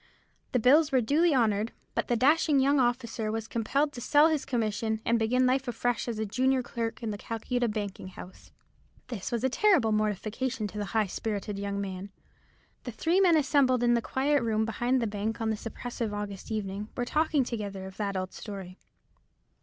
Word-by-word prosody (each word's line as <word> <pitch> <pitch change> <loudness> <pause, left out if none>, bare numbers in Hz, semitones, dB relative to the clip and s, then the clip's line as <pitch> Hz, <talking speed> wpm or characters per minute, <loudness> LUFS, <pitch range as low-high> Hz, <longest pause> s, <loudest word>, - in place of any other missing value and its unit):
The 250 - +2
bills 290 +6 +5
were 260 - +4
duly 300 +9 +3
honoured; 220 -2 +1 0.2
but - - -1
the 240 - +1
dashing 290 +3 +4
young 280 +1 +3
officer 240 -3 0
was 220 0 -3
compelled 275 +7 0
to 245 - -7
sell 295 +5 +5
his 310 -3 -1
commission, 220 -2 -1
and 235 0 +2
begin 250 +3 +2
life 260 +1 +1
afresh 245 0 -1
as 235 -2 -3
a 220 - -1
junior 255 +5 +1
clerk 230 0 -4
in 220 - -2
the 205 - -6
Calcutta 240 +2 -2
banking 205 -3 -4
house. 185 0 -12 0.6
This 225 -7 -5
was 235 -1 -1
a - - +4
terrible 290 - +3
mortification 215 +3 -1
to 210 - -6
the 205 - -2
high 215 - +4
spirited 205 +1 -4
young 200 0 -3
man. 195 0 -5 0.7
The 245 - -5
three 330 - +1
men 350 -4 +5
assembled 265 -4 +3
in 240 0 +4
the 235 - +2
quiet 280 +4 +1
room 220 -2 +1
behind 240 +3 0
the - - +1
bank 215 +1 -3
on 225 -1 0
this 220 +1 -4
oppressive 230 -2 -4
August 205 -2 -6
evening 210 0 -3
were 245 - 0
talking 305 +1 +2
together 205 -5 -5
of 190 0 -10
that 200 -2 -2
old 185 0 -4
story. 195 -3 -8
230 Hz, 195 wpm, -28 LUFS, 210-260 Hz, 0.7 s, bills